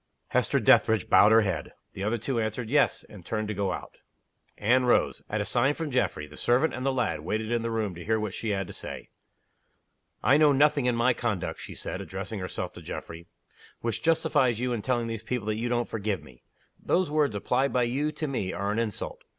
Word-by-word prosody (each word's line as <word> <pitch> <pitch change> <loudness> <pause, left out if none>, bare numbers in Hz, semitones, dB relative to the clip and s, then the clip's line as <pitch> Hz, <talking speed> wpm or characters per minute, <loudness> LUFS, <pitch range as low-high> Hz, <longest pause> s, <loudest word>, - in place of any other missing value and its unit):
Hester - - +2
Dethridge 110 -4 +4
bowed 105 - +7
her 115 0 +7
head. 90 -7 -2 0.2
The 95 - -5
other 110 +3 0
two 115 +2 -2
answered, 110 +1 -3
"Yes" 145 0 +3
and 100 -4 -13
turned 110 +3 -2
to - - -1
go 100 -1 -1
out. - - -7 0.6
Anne 125 +4 +3
rose. 120 - +2
At 105 0 -1
a - - -2
sign 125 +7 +2
from 160 -3 -4
Geoffrey, 125 -11 0
the 75 0 -14
servant 125 +7 +2
and 130 - -4
the 135 - +2
lad 125 -9 0
waited 110 +8 -3
in 120 -1 +1
the 115 - -2
room 110 -4 -1
to 85 0 -9
hear 110 0 +1
what 105 -3 -3
she 115 - -3
had 100 -2 0
to - - -10
say. - - -8 1.1
"I 140 - +5
know 150 -2 +5
nothing 145 -1 +3
in 125 - +2
my 120 +2 +3
conduct," 115 -7 -3
she - - -8
said, - - -5
addressing 100 +3 -5
herself 90 -1 -4
to - - -10
Geoffrey, 85 +1 -8 0.5
"which 115 -2 -2
justifies 155 -7 +2
you 125 0 0
in 115 - -2
telling 120 0 0
these 115 -1 -4
people 125 -4 -3
that 110 0 -1
you 120 +1 -1
don't 120 0 0
forgive 105 -2 -2
me. 65 -2 -16 0.4
Those 180 -4 +1
words 150 -7 +2
applied 130 +7 +1
by 125 - +2
you 140 +6 0
to 155 0 -4
me 110 -9 -2
are 100 +1 -2
an 105 - 0
insult. 110 -4 -4
115 Hz, 225 wpm, -27 LUFS, 105-130 Hz, 1.1 s, bowed